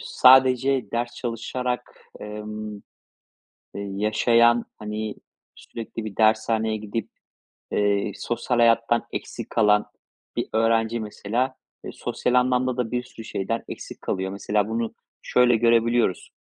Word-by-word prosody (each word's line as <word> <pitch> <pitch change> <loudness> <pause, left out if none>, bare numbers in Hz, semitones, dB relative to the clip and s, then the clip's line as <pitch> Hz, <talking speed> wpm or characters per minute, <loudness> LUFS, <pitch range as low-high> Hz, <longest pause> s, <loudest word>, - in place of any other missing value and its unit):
sadece 130 -2 +4
ders 120 +1 -2
çalışarak, 125 +1 -4 0.2
emm, 105 0 -6 0.9
yaşayan, 110 +4 +2
hani, 105 0 -4 0.4
sürekli 115 -1 -8
bir 105 -3 -7
dershaneye 110 0 +2
gidip, 105 +1 -4 0.6
eee, 100 0 +1
sosyal 120 +3 -2
hayattan 115 0 +3
eksik - - -6
kalan 105 -1 +3 0.5
bir - - -1
öğrenci 115 +1 +2
mesela, 115 +4 -2 0.3
eee, - - -5
sosyal 125 - -2
anlamda 125 0 +2
da 125 -3 -1
bir 125 0 -1
sürü 115 -2 -12
şeyden 115 +4 -3
eksik - - -8
kalıyor. 95 0 -2
Mesela 105 +1 0
bunu 115 0 -2 0.3
şöyle 125 -1 +4
görebiliyoruz. 115 -2 +2
115 Hz, 115 wpm, -24 LUFS, 105-120 Hz, 0.9 s, sadece